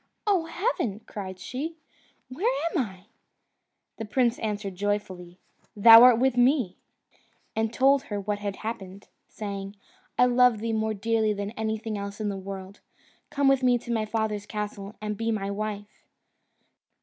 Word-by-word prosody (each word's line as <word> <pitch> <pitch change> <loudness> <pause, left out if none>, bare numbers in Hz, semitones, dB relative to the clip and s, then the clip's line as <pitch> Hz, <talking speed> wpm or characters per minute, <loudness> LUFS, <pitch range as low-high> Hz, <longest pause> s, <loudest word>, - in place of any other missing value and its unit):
"Oh, 385 -6 +2
heaven!" 330 - -2
cried 190 -3 -7
she, 270 - -5 0.5
"where 340 - 0 0.2
am 345 - 0
I?" 190 -5 -7 0.9
The 225 - -5
prince 240 +2 +1
answered 210 -2 -3
joyfully, 185 -3 -3 0.4
"Thou 225 +2 +10
art 250 -2 +8
with 260 +1 +2
me," 245 -6 +3 0.8
and 220 0 0
told 270 +3 +3
her 205 -1 -4
what 205 +1 -3
had 200 -1 -4
happened, 200 -3 -7 0.2
saying, 200 -1 -6 0.4
"I 250 - +6
love 250 -1 +4
thee 225 +1 -3
more 220 0 0
dearly 220 +1 +1
than 200 0 -4
anything 220 -1 -3
else 200 +1 -6
in 215 -1 -1
the 200 - -3
world. 195 0 -8 0.5
Come 280 -1 +1
with 270 -1 +4
me 250 -1 +4
to 235 0 -5
my 220 -2 0
father's 215 -2 -2
castle, 210 -1 -5
and 210 0 -2
be 230 +1 -1
my 200 -2 -2
wife." 205 0 -6
215 Hz, 155 wpm, -26 LUFS, 200-240 Hz, 0.9 s, Thou